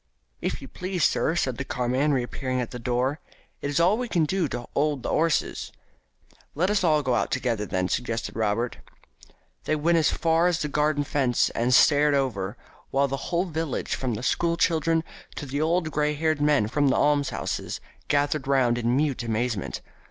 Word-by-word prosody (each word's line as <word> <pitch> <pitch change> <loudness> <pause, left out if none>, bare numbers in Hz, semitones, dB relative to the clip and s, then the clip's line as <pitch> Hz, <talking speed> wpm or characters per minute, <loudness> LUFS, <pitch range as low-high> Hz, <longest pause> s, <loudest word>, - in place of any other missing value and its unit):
"If - - -3
you - - -8
please, 180 -2 -3
sir," 160 - +2
said 130 -7 -1
the - - -1
carman, 130 +3 0
reappearing 130 0 -1
at 125 - -3
the 125 - -6
door, 125 +5 -1 0.4
"it's 145 +1 -1
all 175 +4 +5
as 220 - -1
we 250 - -2
can 170 -5 +2
do 180 +1 0
to 120 -2 -5
'old 150 0 +1
in - - -12
the - - -2
'osses." 160 -2 0 0.8
"Let 180 +7 +1
us 210 -2 +1
all 155 -3 +3
go 130 -2 +1
out - - +1
together 115 -5 -1
then," 90 -1 -1
suggested 115 +2 -2
Robert. 110 +2 -1 0.9
They 155 - +1
went 165 +3 +2
as 155 - +3
far 165 +1 +2
as 175 -1 +1
the 150 - -2
garden 150 0 +1
fence 135 -4 +1
and 120 +2 0
stared 145 +2 +5
over, 115 -6 -1 0.3
while 140 +1 +2
the 135 - -2
whole 175 +1 +1
village, 160 -5 -3
from 125 -4 -2
the 110 - -6
school 170 +5 +1
children 165 -1 +2 0.3
to - - -5
the 140 +2 -3
old 165 0 +1
grey 150 0 0
haired 155 0 0
men 145 -8 +3
from 145 +5 +1
the 130 - +3
almshouses, 145 -2 0 0.3
gathered 145 -1 +1
round 125 -3 +2
in 120 +2 +1
mute 145 -4 0
astonishment. 115 -2 -2
145 Hz, 190 wpm, -25 LUFS, 125-160 Hz, 0.9 s, all